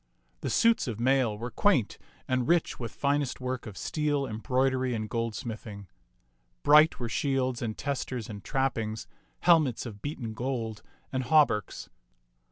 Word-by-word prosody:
The - - -3
suits 230 -8 +3
of 115 -3 -4
mail 125 -3 +2
were 120 +3 -5
quaint 145 - +2 0.3
and 130 -1 0
rich 170 -1 +2
with 115 -2 -4
finest 140 -1 0
work 130 -2 -4
of 105 - -9
steel, 150 -2 0
embroidery, 130 +2 0
and 110 -1 -3
goldsmithing. 110 -3 -4 0.8
Bright 150 +2 +6
were 120 - -2
shields 130 -1 0
and 110 -2 -3
testers 130 -4 -3
and 100 -2 -8
trappings, 115 -6 -1 0.4
helmets 155 -10 +4
of 105 -4 -8
beaten 125 -6 -5
gold, 115 -3 -3 0.3
and 130 -1 -1
hauberks. 145 - +2
125 Hz, 140 wpm, -29 LUFS, 115-140 Hz, 0.8 s, Bright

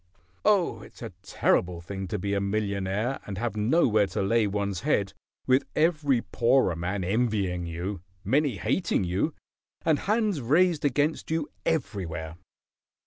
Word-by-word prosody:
Oh, 200 -5 +2
it's - - -13
a - - -6
terrible 90 -1 +1
thing 95 +3 -6
to 105 - -2
be 100 +1 -2
a 100 - +1
millionaire 100 +3 -1
and 100 -2 -5
have 115 0 -2
nowhere 110 -2 +3
to 95 - -2
lay 110 +2 +2
one's 100 -2 -2
head, 105 -10 0 0.3
with 130 +2 +4
every 150 -6 +2
poorer 120 -6 +2
man 90 +4 -2
envying 100 -4 0
you, 85 +3 -4 0.2
many 135 +1 +1
hating 90 - 0
you, 95 - -1 0.5
and 155 -3 +3
hands 210 -6 0
raised 160 +6 +3
against 145 +3 0
you 160 -2 -1 0.2
everywhere." 85 - -2
105 Hz, 140 wpm, -27 LUFS, 95-145 Hz, 0.5 s, with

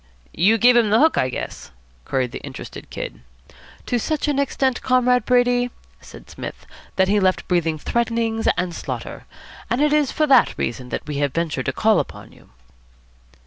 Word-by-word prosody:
"You 200 +8 +3
gave 245 +2 +5
him 235 -3 +4
the 215 - +4
hook, 315 +2 +4
I 130 - +1
guess?" 125 - -6 0.4
queried 130 -2 -1
the - - -7
interested - - -9
Kid. - - -7 0.6
"To 245 - 0
such 305 +5 -2
an 285 -2 +1
extent, 265 -2 0
Comrade 250 -2 +2
Brady," 245 0 +2 0.3
said - - -14
Psmith, - - -8 0.3
"that 190 0 +3
he 205 +2 +3
left 185 -1 +1
breathing 170 -3 +1
threatenings 230 +4 -1
and 180 -1 -1
slaughter. - - -6 0.4
And 240 - 0
it 300 0 +3
is 300 -3 +2
for 310 - +1
that 270 -4 +4
reason 125 +2 -3
that - - -4
we 150 -1 -4
have 140 -1 -1
ventured 160 -6 -2
to - - +2
call 220 +10 +3
upon - - -6
you." - - -20
225 Hz, 180 wpm, -21 LUFS, 170-250 Hz, 0.6 s, gave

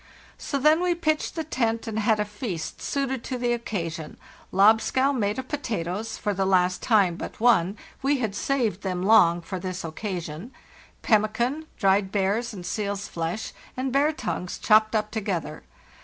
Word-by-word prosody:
"So 280 - -2
then 305 +4 +4
we 360 -1 +2
pitched 310 -2 -1
the 325 - -2
tent 230 -6 -1
and 220 -1 -3
had 215 0 +2
a 210 - +1
feast 210 -5 -5
suited 265 -3 -2
to 255 - -3
the 240 0 +1
occasion: 165 -9 -4 0.3
lobscouse 225 +7 +4
made 210 -3 0
of 260 0 -5
potatoes 220 - -3
(for 205 - -1
the 195 0 0
last 185 -1 +2
time 200 -7 +3
but - - -7
one; 215 -4 +3 0.2
we 275 +1 +2
had 220 -6 -2
saved 225 -4 0
them 185 -2 -2
long 185 -5 +5
for 185 +2 -5
this 185 0 -5
occasion), 175 - -5 0.5
pemmican, 235 +8 +1
dried 195 -1 +2
bear's 205 +5 0
and 185 -5 -8
seal's 200 +1 -3
flesh, 170 +6 -4 0.2
and 260 0 -2
bear 285 +3 +3
tongues, 180 - -4
chopped 215 +1 +4
up 215 0 0
together. 180 -9 -3
215 Hz, 165 wpm, -25 LUFS, 185-250 Hz, 0.5 s, long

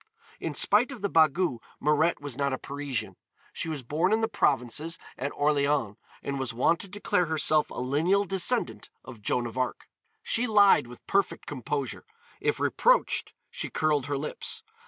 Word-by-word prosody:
In - - -4
spite 225 +7 +4
of 240 -7 -9
the 200 - +1
bagou 160 -4 +3 0.2
Mirette 150 +3 +2
was 145 -4 -5
not 140 0 0
a - - -1
Parisian. 130 -10 -4 0.4
She - - -3
was 150 -4 -4
born 160 - 0
in 220 +1 +3
the 225 - +2
provinces, 145 - 0 0.2
at 140 +3 -3
Orléans, 145 -6 +1 0.3
and 140 -1 -3
was 125 -3 -3
wont 165 +8 +3
to - - -6
declare 185 -3 0
herself 155 -1 +2
a - - -10
lineal 160 +11 +1
descendant 190 -2 -1 0.2
of 110 - -11
Joan 120 +4 0
of 120 +2 -5
Arc. 130 - -2 0.4
She 250 - +2
lied 205 - +5
with 120 0 -13
perfect 195 -1 0
composure; 140 0 -4 0.4
if - - 0
reproached - - +2 0.2
she - - -4
curled 150 -3 +1
her 145 -1 -1
lips. 150 +2 -4
150 Hz, 170 wpm, -28 LUFS, 130-180 Hz, 0.4 s, lied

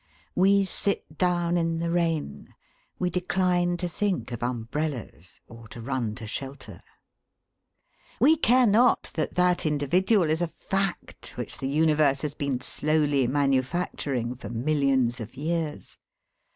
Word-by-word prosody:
We 195 +2 +4
sit 190 -5 -2
down 175 -1 +1
in 165 -1 0
the 170 0 -2
rain. 165 - -2 0.4
We 180 -1 -1
decline 180 -1 +1
to 180 0 -2
think 185 -4 -2
of 120 - -5
umbrellas, 120 - -4
or 115 0 -13
to 120 - -10
run 120 -3 -2
to 110 - -8
shelter. 130 -4 -7 1.4
We 295 +7 +6
care 255 -4 +4
not 230 +4 +3
that 155 - -2
that 180 0 +3
individual 165 - +2
is 160 +2 0
a 175 - +1
fact 195 +3 -4
which - - -5
the 135 - -2
universe 150 -2 +3
has 150 -2 -2
been 140 -4 -2
slowly 145 -4 +1
manufacturing 135 -2 0
for 120 -5 -9
millions 130 -1 +1
of 115 +3 -8
years. 155 +1 -3
155 Hz, 135 wpm, -26 LUFS, 130-175 Hz, 1.4 s, We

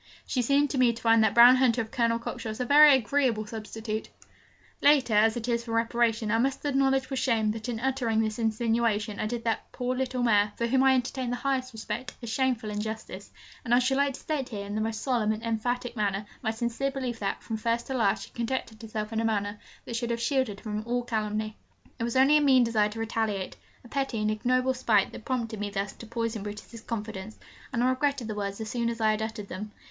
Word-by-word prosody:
'She 255 - 0
seemed 280 +4 +3
to 275 -1 -2
me 250 -2 +5
to 230 - -8
find 225 -1 +4
that 220 -1 +2
brown 245 +2 +9
hunter 250 -2 +3
of 220 -1 -3
Colonel 230 -1 +1
Cockshott's 225 -1 -5
a 250 - 0
very 290 +2 +8
agreeable 250 -2 +1
substitute.' 220 0 -5 0.7
Late 285 -4 +4
as 220 +2 +4
it 235 0 -4
is 235 -1 0
for 230 -1 -6
reparation, 230 -1 +1
I 225 - +2
must 270 +4 0
acknowledge 270 -1 +1
with 265 - -1
shame 225 -5 +2
that 225 +2 -5
in 230 -2 -3
uttering 245 -3 0
this 220 0 -1
insinuation, 225 -2 0
I 215 - -1
did 235 +1 -4
that 225 0 -2
poor 250 0 -2
little 255 -1 -1
mare 210 -3 +3
(for 235 - -1
whom 260 +3 +2
I 265 0 +5
entertained 250 0 -2
the - - 0
highest 260 -1 -1
respect) 225 +2 -5
a - - -3
shameful 235 -2 0
injustice; 210 -2 -5 0.3
and 240 0 +3
I - - +5
should 255 +2 +2
like 280 -1 +1
to - - -10
state 285 -4 -3
here, 205 -4 -5
in 200 - -6
the 215 - -1
most 220 0 -3
solemn 235 -5 +1
and 215 +1 -7
emphatic 245 +2 -2
manner, 205 -2 -1 0.2
my 230 - -1
sincere 235 +4 -1
belief 255 -4 -4
that, 195 -1 -3
from 225 - -3
first 230 +2 -1
to 265 - -4
last, 215 -5 +1
she - - -11
conducted 235 -2 -3
herself 215 0 -5
in 225 - 0
a - - -2
manner 205 -2 -1 0.3
that 235 - -5
should 235 0 -2
have 235 0 -1
shielded 235 -4 0
her - - -23
from 215 -1 -3
all 245 +1 0
calumny. 215 -2 -2 0.4
It 230 - -1
was 235 - -3
only 270 +3 +6
a - - +2
mean 265 -3 +5
desire 220 -3 +2
to 220 +2 -8
retaliate, 220 -4 -2 0.3
a - - -13
petty 270 -3 -2
and 215 0 +1
ignoble 255 +4 +1
spite, 225 -6 +2
that 220 - -10
prompted 230 -4 -2
me 205 0 -2
thus 200 0 -3
to 230 - -11
poison 230 -1 -3
Brutus's 210 +3 -8
confidence, 220 -2 -6 0.3
and 235 - 0
I 255 - +4
regretted 275 -2 0
the 215 - -3
words 200 -1 -4
as 220 - -4
soon 235 +1 -1
as 230 0 -4
I 220 -1 +3
had 215 0 -1
uttered 220 -2 -4
them. 210 +3 -6
230 Hz, 235 wpm, -28 LUFS, 215-255 Hz, 0.7 s, brown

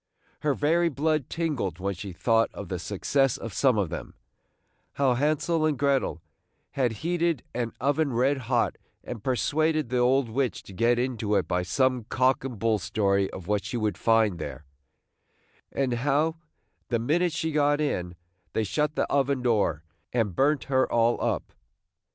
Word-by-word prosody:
Her 145 -2 0
very 170 +5 +2
blood 155 -1 0
tingled 140 - -2
when 100 +2 -2
she 95 +2 -7
thought 115 +5 +2
of 100 -4 -7
the 90 - -3
success 125 +8 0
of 115 -4 -7
some 130 0 +3
of 95 -7 0
them, - - -6 0.4
– - - -45
how 135 -3 +2
Hensel 155 +5 +1
and 155 -3 +1
Grettel 135 - +1 0.5
had 130 -4 +1
heated 170 -4 0
an 120 -1 -2
oven 145 +3 +1
red 130 +4 +2
hot, 120 -3 +1 0.2
and 115 -4 -7
persuaded 155 +2 +1
the 125 0 0
old 130 +1 +3
witch 125 +1 -1
to 95 - -12
get 115 +5 +2
into 115 -4 -1
it - - +1
by 90 - 0
some 125 +5 +1
cock 130 +2 +2
and 130 -4 -5
bull 110 +1 +1
story 100 -1 +1
of 95 - -8
what 105 0 0
she 110 +5 -4
would 105 -4 0
find 110 -3 +2
there; 75 -1 -6 1.1
and 135 -3 0
how, 145 +6 +1 0.5
the 120 - +1
minute 165 +10 +1
she 160 +1 -2
got 145 -1 +2
in, 90 -13 -2 0.4
they 110 - +1
shut 150 +9 0
up - - -35
the - - +1
oven 140 -2 +1
door, 105 -10 +1 0.3
and 110 -7 0
burnt 145 +1 +2
her 130 -1 +1
all 115 0 +2
up! - - -2
125 Hz, 175 wpm, -27 LUFS, 105-145 Hz, 1.1 s, some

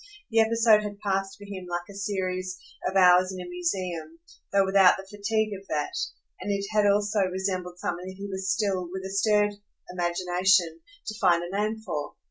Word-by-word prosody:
The 225 - +3
episode 225 -1 +5
had 205 -1 -6
passed 195 -1 -1
for 205 - -11
him 190 -3 -7
like 175 0 -3
a 200 - -11
series 185 -2 -3 0.3
of 190 - -8
hours 180 0 +6
in 185 - -6
a 180 - -6
museum, 175 -2 -3 0.3
though 195 -1 +4
without 190 -1 +6
the 195 - -8
fatigue 210 +1 -1
of 195 0 -9
that; 150 -1 -2 0.5
and 205 - -3
it 200 0 -1
had 210 -1 +3
also 205 +1 +2
resembled 185 -1 -3
something 180 +1 -4
that 190 - -7
he 200 +1 -6
was 190 -1 -4
still, 195 -4 0
with 190 0 -5
a 190 - -5
stirred 205 +1 +3 0.4
imagination, 175 -1 +1 0.2
to 215 0 -6
find 175 -3 +4
a 175 +3 -5
name 215 +2 -1
for. 145 -7 -4
190 Hz, 190 wpm, -27 LUFS, 180-205 Hz, 0.5 s, hours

